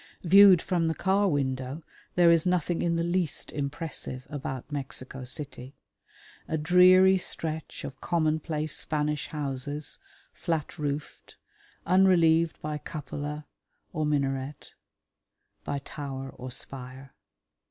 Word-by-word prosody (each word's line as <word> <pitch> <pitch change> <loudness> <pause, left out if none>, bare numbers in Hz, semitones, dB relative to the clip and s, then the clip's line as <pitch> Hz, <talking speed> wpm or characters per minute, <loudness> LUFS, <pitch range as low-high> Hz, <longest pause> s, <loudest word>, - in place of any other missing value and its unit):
Viewed 190 0 +7
from 175 -3 0
the 160 - 0
car 195 +4 +2
window 135 -1 -2 0.3
there 175 -1 +6
is 165 -1 +4
nothing 180 -2 0
in 170 -1 +1
the 165 - 0
least 175 -3 0
impressive 140 -3 -4
about 145 -2 -5
Mexico 135 -2 -4
City. 135 0 -6 0.7
A 160 - -1
dreary 185 +4 +6
stretch 160 -3 -3
of 135 -1 -8
commonplace 155 -2 0
Spanish 150 -1 -1
houses, 145 0 -4 0.3
flat 165 -2 -3
roofed, 145 0 -5 0.5
unrelieved 170 -3 +4
by 150 0 -3
cupola 150 +1 -6 0.5
or 155 -3 -1
minaret, 140 -1 -2 0.9
by 145 - -2
tower 135 -1 -6
or 130 0 -8
spire. 130 +1 -7
150 Hz, 110 wpm, -28 LUFS, 140-170 Hz, 0.9 s, Viewed